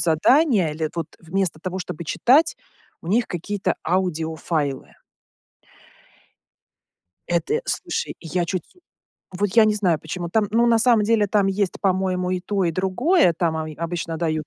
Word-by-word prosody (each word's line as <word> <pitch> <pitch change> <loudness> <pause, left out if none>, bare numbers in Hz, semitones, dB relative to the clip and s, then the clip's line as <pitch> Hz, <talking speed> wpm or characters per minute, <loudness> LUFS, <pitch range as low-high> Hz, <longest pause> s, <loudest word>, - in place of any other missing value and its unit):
задания 195 - +3
или, 155 0 -2
это 165 +2 -4
вот, - - -6
вместо 180 -1 -2
того, 185 0 -4
чтобы 170 -2 -6
читать, 270 - +3 0.5
у - - -12
них 225 +5 +2
какие-то 185 +2 -2
аудиофайлы. 160 -5 -2 2.3
Это, 295 - 0
слушай. - - -3
Я 175 +1 -2
чуть 180 -1 -3
су 360 - -26 0.6
Вот, 205 0 +1
я 225 - +7
не 210 - +2
знаю, 180 -7 +1
почему 170 +2 -5
там, 220 0 +2
ну, 235 +2 +3
на 230 -1 +4
самом 225 -2 +4
деле, 220 -1 +2
там 200 0 +2
есть, 195 -1 -1
по-моему, 185 -1 0
и 185 - -1
то, 195 +1 -1
и 170 - +1
другое. 190 - +2
Там, 165 -2 +1
они 155 -1 -4
обычно 165 0 -4
дают 155 -2 -2
185 Hz, 160 wpm, -22 LUFS, 165-210 Hz, 2.3 s, я